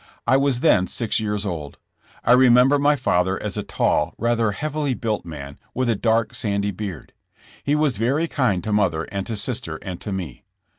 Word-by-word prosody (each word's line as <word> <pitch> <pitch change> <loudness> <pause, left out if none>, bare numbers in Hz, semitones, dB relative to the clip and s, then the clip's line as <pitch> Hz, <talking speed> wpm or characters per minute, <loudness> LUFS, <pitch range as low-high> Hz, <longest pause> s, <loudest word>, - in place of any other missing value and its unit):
I - - +4
was 135 -2 +2
then 90 -2 +4
six 115 -2 -1
years 105 -1 -2
old. 80 -7 -5 0.5
I - - +3
remember 125 +2 +6
my 145 +1 +4
father 95 -7 +1
as 105 -3 -3
a - - -1
tall, - - 0
rather 115 -1 +1
heavily 150 +3 -2
built 110 -3 -2
man, 70 -4 -8 0.2
with 130 -1 0
a 115 - +2
dark 115 +1 +1
sandy 100 -1 -1
beard. 100 -2 -7 0.5
He 145 - +1
was 150 -6 +1
very 135 +9 +1
kind 120 - 0
to 110 -1 -2
mother 90 -7 +1
and 100 -1 -3
to 115 - -3
sister 105 -6 -3
and 90 -3 -6
to 105 - -5
me. 90 -8 -5
110 Hz, 190 wpm, -22 LUFS, 95-130 Hz, 0.5 s, remember